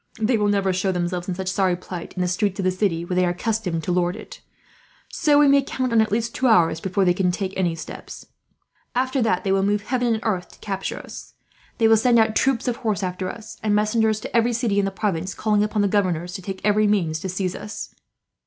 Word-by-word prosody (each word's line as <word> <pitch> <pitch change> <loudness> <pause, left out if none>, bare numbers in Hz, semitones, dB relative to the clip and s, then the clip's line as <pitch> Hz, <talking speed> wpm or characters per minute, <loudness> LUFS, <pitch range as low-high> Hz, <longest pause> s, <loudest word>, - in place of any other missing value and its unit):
They 220 +3 +2
will 210 -2 +1
never 200 -2 +1
show 190 +1 0
themselves, 175 0 -2
in 180 - -2
such 190 0 -5
sorry 185 -1 +1
plight, 180 -1 -8
in 180 - -1
the - - 0
streets 190 +2 -1
of - - 0
the 185 - +2
city 180 -3 -1
where 180 - -4
they 180 0 +2
are 180 - +2
accustomed 190 -7 -2
to 180 - -2
lord 180 0 +1
it; - - -11 0.7
so 295 -1 +2
we 295 0 +6
may 280 0 +5
count 255 -2 -3
on 225 - +5
at 220 - 0
least 230 +2 -1
two 260 - +1
hours 170 -8 +4
before 190 +1 0
they 180 - +4
can 180 0 +1
take 190 +1 -2
any 175 -3 0
steps. 165 - -9 0.7
After 260 +1 +1
that, 200 -6 +1
they 195 - 0
will 195 0 +3
move 205 +1 +1
heaven 245 +1 0
and 220 - +1
earth 190 -5 -1
to - - -19
capture 195 -2 -4
us. - - -10 0.4
They 225 - +4
will 225 0 +6
send 235 +2 +3
out 220 -1 +3
troops 265 -1 +1
of 245 - 0
horse 215 -5 -1
after 185 0 -3
us, 220 -1 -9
and 210 -1 +1
messengers 215 +1 +2
to - - -7
every 235 +1 +3
city 225 -4 +1
in 200 - +2
the - - 0
province, 190 -2 -2
calling 210 -1 +1
upon 210 -1 0
the - - +3
governors 180 -4 0
to 195 - -6
take 190 +1 -6
every 210 0 +3
means 170 -7 +1
to 190 - -5
seize 185 0 -2
us. 210 - -7
200 Hz, 245 wpm, -23 LUFS, 180-220 Hz, 0.7 s, we